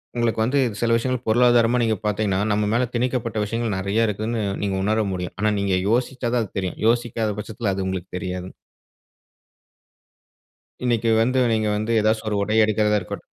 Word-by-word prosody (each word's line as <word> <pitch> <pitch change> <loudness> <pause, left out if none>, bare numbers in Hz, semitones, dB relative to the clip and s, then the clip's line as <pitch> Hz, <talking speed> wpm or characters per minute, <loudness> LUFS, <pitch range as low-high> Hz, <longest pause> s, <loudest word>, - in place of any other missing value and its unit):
உங்களுக்கு 120 -2 0
வந்து 130 +5 +1 0.2
சில 120 - +1
விஷயங்கள் 130 +1 -2
பொருளாதாரமா 120 +1 +4
நீங்க 110 -2 +1
பாத்தீங்கன்னா, 105 -2 0
நம்ம 105 0 +1
மேல 120 +2 +2
திணிக்கப்பட்ட 120 -2 -1
விஷயங்கள் 115 -1 -2
நெறைய 100 +4 +1
இருக்குதுன்னு 110 +2 -2 0.2
நீங்க 100 -1 -1
உணர 110 +1 +2
முடியும். 90 -1 -5
ஆனா 105 +1 +2
நீங்க 100 -1 +1
யோசிச்சாதான் 120 0 0
அது 105 - -11
தெரியும். 95 -2 -4
யோசிக்காத 115 -2 0
பட்சத்துல 105 -1 -3
அது 95 0 -2
உங்களுக்கு 95 -1 -4
தெரியாதுங். 90 0 -5 2.3
இன்னிக்கு 115 -2 +1
வந்து 130 +3 +2
நீங்க 110 -1 +1
வந்து 110 +2 -2
ஏதாவது 110 +1 +2
ஒரு 105 - 0
உடை 105 +2 0
எடுக்கறதா 105 0 +2
இருக்கட் 90 - -7
110 Hz, 155 wpm, -22 LUFS, 100-120 Hz, 2.3 s, பொருளாதாரமா